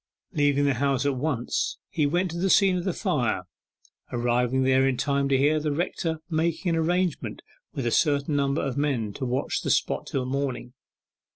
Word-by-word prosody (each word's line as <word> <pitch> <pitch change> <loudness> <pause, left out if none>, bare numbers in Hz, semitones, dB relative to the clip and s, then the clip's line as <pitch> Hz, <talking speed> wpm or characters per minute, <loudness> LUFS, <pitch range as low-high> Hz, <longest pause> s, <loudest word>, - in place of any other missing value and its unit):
Leaving 145 -3 +2
the 140 - +3
house 135 +1 0
at 140 -1 +1
once, 130 -3 -1
he 150 -3 +1
went 175 +4 0
to 170 - -5
the 190 +2 +1
scene 195 -1 +5
of 180 0 -2
the 190 - +1
fire, 150 - -1 0.7
arriving 120 +2 +1
there 130 0 +4
in 130 -2 0
time 140 +1 0
to 135 - +3
hear 150 +3 +3
the 150 0 -1
rector 165 +1 -2
making 165 +2 0
an - - +1
arrangement 175 +1 -1 0.3
with 135 - -3
a 120 - +1
certain 145 +1 +2
number 140 +1 +1
of 135 -2 -2
men 130 -8 0
to 135 - -4
watch 125 +2 -1
the - - -3
spot - - 0
till 130 -2 -2
morning. 130 -2 -3
140 Hz, 190 wpm, -26 LUFS, 130-160 Hz, 0.7 s, scene